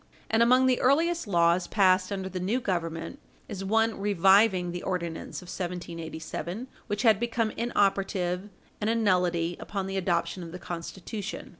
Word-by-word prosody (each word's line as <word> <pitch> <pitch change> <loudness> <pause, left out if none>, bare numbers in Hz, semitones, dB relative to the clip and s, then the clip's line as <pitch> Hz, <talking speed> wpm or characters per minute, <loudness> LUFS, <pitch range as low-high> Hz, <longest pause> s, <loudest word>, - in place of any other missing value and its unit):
And 225 +1 +3
among 255 +2 +5
the 255 -1 +2
earliest 325 +3 +2
laws 170 -1 +3
passed 185 -1 +3
under 190 -1 -3
the 185 -1 -5
new 200 +8 0
Government 170 - -3 0.3
is 195 -3 -6
one 225 +2 +1
reviving 195 -1 +4
the 175 0 -5
Ordinance 175 -1 -4
of - - -14
1787, 175 +3 -5 0.2
which 205 +3 -2
had 220 -4 +5
become 230 -2 0
inoperative 195 -4 0 0.3
and 210 - +1
a 230 - +2
nullity 180 -5 +1
upon 195 -2 -4
the 195 0 -3
adoption 175 -1 -1
of 165 -1 -8
the - - -5
Constitution. 185 +4 -6
190 Hz, 155 wpm, -28 LUFS, 175-220 Hz, 0.3 s, among